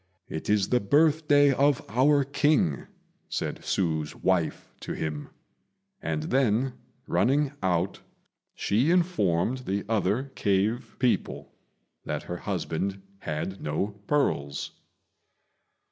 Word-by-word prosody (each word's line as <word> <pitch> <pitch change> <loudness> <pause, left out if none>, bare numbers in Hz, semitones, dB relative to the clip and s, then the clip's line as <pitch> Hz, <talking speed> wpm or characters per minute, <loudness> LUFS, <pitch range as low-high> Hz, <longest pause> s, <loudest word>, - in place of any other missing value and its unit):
"It 80 - -5
is 105 -2 +2
the 125 - +3
birthday 145 +4 +4
of 140 +1 +2
our 140 +6 +3
King," 140 - +1 0.4
said - - -2
Hsü's 80 -5 -1
wife 90 -4 -1
to - - -5
him; 75 -2 -4 0.7
and 155 - -2
then, 130 -4 +1 0.3
running 140 +2 +2
out, 90 +1 0 0.6
she 115 +9 +1
informed 130 - +2
the 100 -5 -3
other 110 +5 0
cave 105 +5 0
people 125 -2 -1 0.5
that - - -3
her 90 - -5
husband 95 +1 -3 0.2
had 80 +5 -4
no 75 +7 -1 0.2
pearls. 70 - 0
105 Hz, 105 wpm, -27 LUFS, 90-140 Hz, 0.7 s, birthday